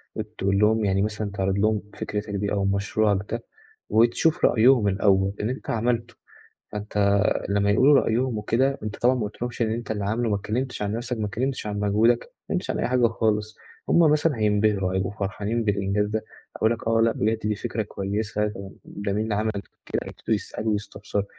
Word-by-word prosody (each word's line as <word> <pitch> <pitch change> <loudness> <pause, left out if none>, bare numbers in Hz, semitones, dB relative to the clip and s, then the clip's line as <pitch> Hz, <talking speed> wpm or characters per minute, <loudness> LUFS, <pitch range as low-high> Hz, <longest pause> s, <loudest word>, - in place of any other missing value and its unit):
وتقول 105 -2 -1
لهم 110 +1 +3
يعني 95 0 +2
مثلًا 105 0 -2
تعرِض 95 -1 -1
لهم 105 0 +2 0.2
فكرتك 105 0 -4
دي 100 0 -2
أو 100 -1 0
مشروعك 100 +1 0
ده، 115 0 -3 0.5
وتشوف 120 +8 +3
رأيهم 120 -2 +5
الأول 95 0 +2
اللي 110 +4 -1
أنت 130 - -7
عملته، 115 0 -1 0.6
فأنت 105 -1 +1 0.3
لمّا 100 0 +2
يقولوا 135 +8 +5
رأيهم 120 0 0
وكده، 130 +6 +1
أنت 105 0 -4
طبعًا 125 +2 +3
ما 125 - -2
قولتلهمش 120 +4 -4
إن 110 - +1
أنت 115 0 -3
اللي 105 -2 -2
عامله، 115 +2 0
ما 105 - +2
اتكلّمتش 115 +5 -3
عن 100 0 -1
نَفْسك، 120 +1 -3
ما 110 - -1
اتكلّمتش 125 +3 -2
عن 105 0 -3
مجهودك، 110 +4 +3
ما - - -16 0.2
اتكلّمتش - - -3
عن - - -1
أي - - +1
حاجة 125 -1 +3
خالص، 110 -1 -1 0.3
هُم - - +4
مثلًا 150 -3 +2
هينبهروا، 105 -3 +2
هيبقوا 95 +1 -1
فرحانين 105 +3 -2
بالإنجاز 100 0 +1
ده، 110 +1 -2 0.3
هيقولوا 110 +1 +2
لك: 115 - -8
"آه، 115 0 +3
لأ 115 0 +4
بجد 110 +1 0
دي 105 -1 -1
فكرة 115 0 -3
كويسة، 105 +1 -2
ده 100 -2 -7
ده 100 -1 -4
مين 105 +2 0
اللي 110 -2 -1
عمل 110 +1 0 0.3
كده؟" - - -2
ويبتدوا - - -2
يسألوا 110 0 -3
ويستفسروا، 105 0 -3
105 Hz, 190 wpm, -25 LUFS, 100-115 Hz, 0.6 s, رأيهم